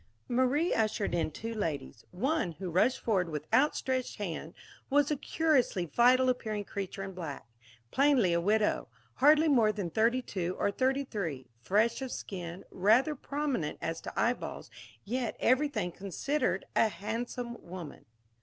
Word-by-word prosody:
Marie 260 +7 +2
ushered 215 -3 0
in 165 -2 +1
two 225 +8 -6
ladies. 145 - -4
One, 230 - -1
who 180 +2 -6
rushed 215 +10 +3
forward 190 -6 +1
with 150 -1 -4
outstretched 260 -2 +1
hand, 170 -5 -5 0.3
was 290 +1 +3
a - - +2
curiously 280 - +1
vital 250 - +4
appearing 220 -4 -1
creature 195 -1 -5
in 195 - -5
black 165 -6 -6 0.5
plainly 265 -10 +4
a 170 - +2
widow 210 -2 +1 0.3
hardly 305 +3 +6
more 235 -8 +4
than 195 -5 -4
thirty 235 +6 +2
two 185 -5 -3
or 200 - +1
thirty 265 +5 +1
three, 165 - -4 0.2
fresh 220 - +2
of 260 -2 -4
skin, 180 -1 -6
rather 225 +11 +3
prominent 280 - -2
as 165 0 -3
to - - -5
eyeballs, 245 +2 -1 0.3
yet, 240 +3 -2
everything 255 -8 +2
considered, 255 - -1
a 225 - +5
handsome 235 +5 -4
woman. 175 -3 -9
220 Hz, 145 wpm, -31 LUFS, 180-260 Hz, 0.5 s, hardly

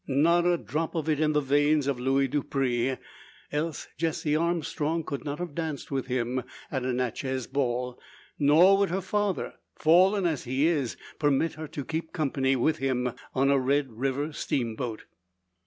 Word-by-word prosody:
Not 170 +6 +3
a 175 -1 +3
drop 155 +8 -3
of 160 -2 -2
it 150 -2 +1
in 155 -1 +2
the 150 - +3
veins 145 +1 +3
of 135 -3 -1
Luis 135 +2 +2
Dupre; 135 -3 0 0.5
else 155 +1 -2
Jessie 160 -1 0
Armstrong 165 -1 0
could 140 -2 -5
not 145 -1 -3
have 175 -3 -5
danced 155 -3 -4
with 135 -2 -2
him 125 0 -1 0.3
at 130 -3 -1
a 130 - 0
Natchez 130 +1 -2
ball; 125 -2 -2 0.4
nor 165 +7 +6
would 200 - +2
her 185 +3 0
father, 205 0 -1 0.2
fallen 185 +5 +4
as 160 -5 -1
he 130 +4 +1
is, 150 -8 0 0.2
permit 145 +2 +2
her 155 0 -7
to 140 -2 -6
keep 160 +2 -4
company 135 -4 +1
with 155 +5 +1
him 125 -2 0 0.2
on 135 +1 +3
a 140 - +4
Red 135 0 +1
River 135 +6 -2
steamboat. 120 -4 -2
145 Hz, 170 wpm, -27 LUFS, 130-160 Hz, 0.5 s, nor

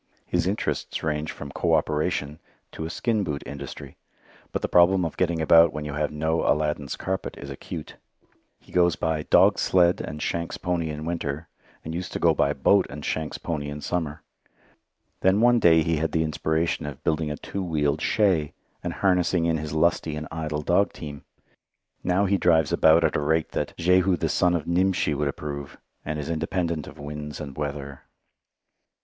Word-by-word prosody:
His 90 0 0
interests 100 +3 -2
range 75 0 -1
from 70 - -8
coöperation 75 -1 0 0.3
to 80 - -6
a - - -4
skin 110 +3 0
boot 75 -5 -3
industry. 70 -1 -8 0.5
But - - -3
the - - +1
problem 90 +1 +4
of 80 - -4
getting 85 -2 0
about 80 +1 +6
when 75 -1 -4
you 75 - -4
have 75 +1 -1
no 80 +2 0
Aladdin's 75 -2 0
carpet 95 0 -4
is 70 0 -8
acute. 75 +3 -8 0.6
He - - -20
goes 85 -2 +3
by 80 -1 -1
dog - - +4
sled 90 -1 +3
and 75 +4 -6
shanks' 85 +2 -2
pony 85 -3 -1
in 75 0 -5
winter, 80 -1 -3 0.4
and 80 - -5
used 90 +2 -4
to - - -2
go 85 -1 +4
by - - +2
boat 100 -2 +3
and 70 0 -7
shanks' 80 -1 -2
pony 75 -3 -4
in 75 +1 -6
summer. 80 -2 -3 1.0
Then 95 +2 +3
one 120 +1 +5
day 80 -5 +5
he 80 0 0
had 80 +1 -1
the 80 - +2
inspiration 80 0 -1
of 70 -2 -8
building 80 -1 0
a 75 - -4
two 100 - -5
wheeled 75 -4 0
shay, 90 -8 +2 0.3
and - - -3
harnessing 90 -2 +3
in 85 -1 +2
his 75 0 -5
lusty 80 -1 +1
and 75 0 -5
idle 75 -2 -3
dog 90 +5 +2
team. 75 -3 -8 0.8
Now 95 +3 +2
he 100 0 +2
drives 80 -4 +3
about 80 +1 +5
at 80 - +1
a - - +2
rate 80 +2 +1
that - - -3
"Jehu 90 +2 +3
the - - -1
son 90 -1 +2
of 85 - -2
Nimshi 90 -2 +1
would 75 +1 -1
approve," 70 0 -5 0.3
and 75 0 -3
is 75 - -4
independent 85 -1 -2
of - - -11
winds 75 0 -7
and 70 -3 -7
weather. 70 -2 -5
80 Hz, 185 wpm, -25 LUFS, 75-85 Hz, 1.0 s, about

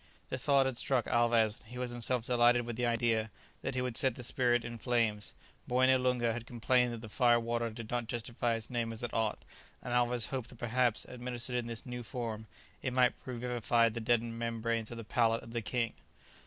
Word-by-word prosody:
The 130 - -2
thought 140 +1 +4
had 130 -2 -1
struck 130 -1 +1
Alvez, 115 -2 +3
and 110 - -20
he 125 - -8
was 125 -1 -3
himself 120 0 -1
delighted 120 -1 +4
with 120 -1 -4
the 120 +1 0
idea, 115 -1 +1 0.3
that - - -3
he 125 - 0
would 125 -2 -3
set 130 -3 +4
the 125 - -8
spirit 120 -1 +2
in 120 0 -6
flames. 115 -4 0 0.3
Moené 130 +1 +4
Loonga 125 -2 +1
had 120 0 -6
complained 125 +1 +2
that 115 -1 -6
the 110 - -8
"fire 120 +1 +4
water" 115 0 -1
did 110 0 -8
not 120 -2 -1
justify 120 0 -1
its 115 +2 -4
name 120 -2 -1
as 115 +1 -7
it 120 - -3
ought, 110 -2 -1 0.3
and 120 - -5
Alvez 120 -1 +2
hoped 130 -4 -3
that 125 - -11
perhaps, 120 0 +1
administered 125 0 -4
in 120 -1 -1
this 115 -2 -6
new 125 -1 -5
form, 115 -2 -5 0.3
it 130 - -2
might 125 -1 +4
revivify 120 -2 +1
the 115 +1 -5
deadened 115 0 0
membranes 115 -1 -1
of 120 - -7
the 115 - -6
palate 115 +1 +1
of 115 - -11
the 115 - -1
king. 115 +1 -1
120 Hz, 215 wpm, -32 LUFS, 115-125 Hz, 0.3 s, thought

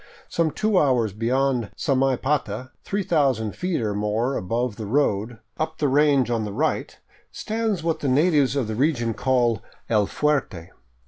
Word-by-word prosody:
Some 165 -1 +1
two 210 +3 +1
hours 125 - +2
beyond 120 +1 0
Samaipata, 130 -3 0
3000 145 - 0
feet 180 -8 -2
or 105 -2 -1
more 105 +6 -1
above 115 +5 -2
the 110 -2 -6
road, 115 -3 0 0.2
up 160 0 -2
the 150 - +1
range 140 -3 +3
on 115 -2 0
the 105 - -4
right, - - -1 0.3
stands 220 -5 -2
what 165 -1 0
the 145 - -2
natives 145 -1 +3
of 135 -6 0
the 110 - -3
region 120 -2 +1
call 120 -4 +1
" - - -35
El 105 -3 +3
Fuerte." 135 - -1
130 Hz, 155 wpm, -23 LUFS, 110-150 Hz, 0.3 s, range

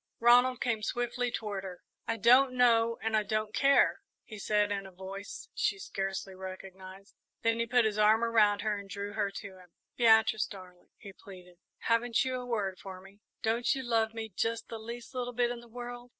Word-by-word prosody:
Ronald 245 +1 +5
came 230 -4 0
swiftly 245 +2 -2
toward 210 -5 -4
her. 185 -2 -9 0.2
"I 230 - -1
don't 255 +5 +5
know 230 -2 +3
and 225 0 0
I 215 - +4
don't 215 +1 -2
care," 275 +2 +3 0.2
he 215 -3 -10
said, 210 0 +1
in 195 -1 -3
a - - -13
voice 190 +2 -8
she 200 - 0
scarcely 195 0 -4
recognised; 190 +1 -10 0.3
then 230 0 +1
he 230 - 0
put 245 -1 +3
his 215 -1 -1
arm 215 +2 +4
around 215 -3 +3
her 210 -2 -1
and 200 -1 -11
drew 200 +2 -5
her 210 -2 0
to 195 -1 -9
him. 180 -2 -19 0.2
"Beatrice, 220 -2 +4
darling," 180 -3 -13
he 200 -3 -11
pleaded, 180 -3 -14 0.2
"haven't 230 +2 +1
you 260 - -2
a 250 - -9
word 200 -6 -2
for 190 -1 -9
me 195 +2 -17 0.2
don't 230 +3 +1
you 265 - -4
love 225 -2 0
me 225 -1 -4
just 230 +2 -2
the 225 - -6
least 235 +3 -8
little 245 -1 -3
bit 240 0 +1
in 240 - -5
the 240 - -15
world?" 245 +1 -8
220 Hz, 200 wpm, -30 LUFS, 195-235 Hz, 0.3 s, Ronald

